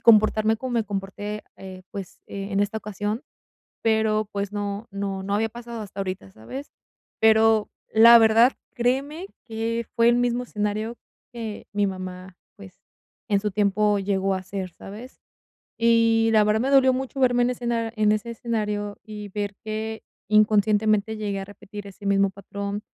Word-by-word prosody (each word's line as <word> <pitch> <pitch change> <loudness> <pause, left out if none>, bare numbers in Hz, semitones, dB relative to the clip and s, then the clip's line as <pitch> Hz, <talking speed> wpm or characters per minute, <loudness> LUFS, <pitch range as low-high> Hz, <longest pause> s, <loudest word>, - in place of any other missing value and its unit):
comportarme 215 0 +5
como 255 +2 -5
me 230 -2 +1
comporté, 205 +1 -5
eh, 185 -1 -10
pues, 195 -3 -7
en 195 0 -4
esta 205 +2 0
ocasión, 210 +3 -3 0.6
pero, 220 -1 +2
pues, 200 0 -2
no 205 +1 -4
no, 195 -1 -3
no 200 +1 -2
había 220 +2 +1
pasado 235 0 -8
hasta 200 -1 -6
ahorita, 185 - -5
¿sabes? 260 - -9 0.5
Pero, 220 -1 +5 0.2
la 230 +2 +9
verdad, 225 +3 +6 0.2
créeme 275 +9 -1 0.2
que 230 +1 -2
fue 235 0 +5
el 240 - +4
mismo 245 0 +1
escenario 215 +1 -3 0.3
que 225 -3 -6
mi 205 -1 +1
mamá, 185 -1 -7 0.2
pues, 195 -2 -14 0.5
en 200 -1 +3
su 210 +1 -1
tiempo, 205 +1 +2
llegó 195 0 0
a 185 - -4
ser, 190 -1 -5
¿sabes? 225 +6 -11 0.6
Y 230 -1 +4
la 215 -1 +5
verdad 210 +1 +2
me 265 +3 0
dolió 265 -1 +6
mucho 265 +1 -4
verme 245 -1 +4
en 245 - +1
escena 235 -2 -2
en 210 -1 +3
ese 215 +2 -2
escenario, 210 -3 -3
y 210 -1 -8
ver 205 0 -3
que 220 +1 -4 0.3
inconscientemente 215 0 +3
llegué 205 -2 -3
a - - -5
repetir 205 0 -10
ese 200 +1 -12
mismo 200 0 +3
patrón, 200 +1 -5
215 Hz, 160 wpm, -24 LUFS, 200-230 Hz, 0.6 s, la